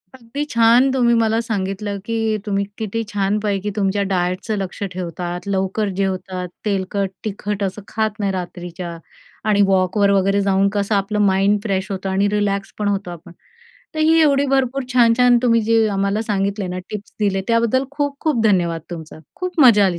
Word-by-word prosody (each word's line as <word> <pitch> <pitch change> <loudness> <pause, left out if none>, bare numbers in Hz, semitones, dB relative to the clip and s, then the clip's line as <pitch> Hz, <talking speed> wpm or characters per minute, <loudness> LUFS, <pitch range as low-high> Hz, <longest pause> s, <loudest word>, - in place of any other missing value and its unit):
अगदी 260 +3 -5
छान 235 +3 +5
तुम्ही 240 -2 +3
मला 225 -1 +2
सांगितलं 200 -2 -3
की 230 +1 -2 0.3
तुम्ही 200 -1 0
किती 225 +1 -3
छानपैकी 205 0 0
तुमच्या 200 -1 +1
डायटचं 185 +4 -1
लक्ष 195 -1 -5
ठेवतात, 175 -2 -4
लवकर 195 +2 0
जेवतात, 185 -1 -2 0.2
तेलकट 195 -1 -1 0.2
तिखट 205 -1 -3
असं 195 +2 -3
खात 220 -1 -2
नाही 200 -2 0
रात्रीच्या 175 -1 -6 0.5
आणि 205 -1 +4
वॉकवर 195 +1 +2
वगैरे 195 +1 +2
जाऊन 195 0 +2
कसं 205 +1 0
आपलं 200 +1 0
माइंड 195 +2 +3
फ्रेश 190 -2 -2
होतं 195 0 -3
आणि 195 +2 +2
रिलॅक्स 200 -1 -1
पण 210 - 0
होतो 200 -2 -1
आपण. 175 0 -11 0.6
तर - - -4
ही 320 +1 +4
एवढी 285 -2 +3
भरपूर 270 0 +1
छान, 235 -2 +5
छान 245 -1 +5
तुम्ही 230 -2 +4
जे 225 0 +3
आम्हाला 200 +2 0
सांगितले 200 -2 -1
ना, 180 0 -4
टिप्स 210 -1 -7
दिले 195 -2 +1
त्याबद्दल 235 +3 +2
खूप 285 -1 -2
खूप 300 -8 +1
धन्यवाद 175 -6 +2
तुमचा. 160 -2 -8 0.2
खूप 365 -3 -3
मजा 220 -7 +7
आली 175 -2 -1
200 Hz, 170 wpm, -20 LUFS, 190-230 Hz, 0.6 s, मजा